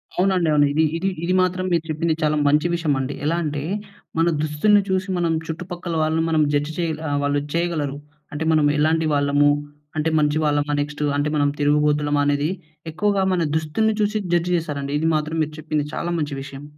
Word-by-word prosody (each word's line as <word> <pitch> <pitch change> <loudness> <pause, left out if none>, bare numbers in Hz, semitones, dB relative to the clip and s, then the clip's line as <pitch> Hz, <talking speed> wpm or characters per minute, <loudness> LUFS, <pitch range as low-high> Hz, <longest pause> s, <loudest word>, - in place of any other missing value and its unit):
అవునండి 185 -3 +2
అవును. 145 -1 +5
ఇది, 160 +2 +3
ఇది 190 +3 0
ఇది 180 +2 +1
మాత్రం 185 0 0
మీరు 170 -2 +2
చెప్పింది 160 +1 0
చాలా 150 0 +2
మంచి 150 +3 +3
విషయమండి. 145 -5 -1
ఎలా 165 +3 +1
అంటే, 145 -2 -2 0.6
మన 165 +1 +3
దుస్తుల్ని 155 +8 +3
చూసి 190 0 0
మనం 170 -2 +1
చుట్టుపక్కల 175 +1 -5
వాళ్ళని 160 +1 +1
మనం 160 -1 +2
జడ్జ్ 145 +2 0
చేయల 160 -3 -2
ఆహ్, 145 - 0
వాళ్ళు 145 0 +1
చేయగలరు. 165 -5 -1 0.4
అంటే 150 +2 -3
మనం 155 -2 +3
ఎలాంటి 160 +1 +2
వాళ్ళము, 145 0 +3 0.5
అంటే 155 +1 +1
మంచివాళ్లమా 150 -1 +1
నెక్టు 150 0 -3
అంటే, 145 +1 0
మనం 145 -1 +3
తిరుగుబోతులమా 145 0 +2
అనేది 145 +2 +1 0.4
ఎక్కువగా 195 +4 +1
మన 180 - +1
దుస్తుల్ని 160 +8 0
చూసి 210 +1 +1 0.2
జడ్జ్ 175 +1 +1
జేశారండి. 145 -4 -3
ఇది 160 - +1
మాత్రం 155 +1 -2
మీరు 155 0 -5
చెప్పింది 155 -1 -1
చాలా 175 - -2
మంచి 145 -2 -2
విషయం. 140 0 -9
155 Hz, 175 wpm, -22 LUFS, 145-170 Hz, 0.6 s, అవును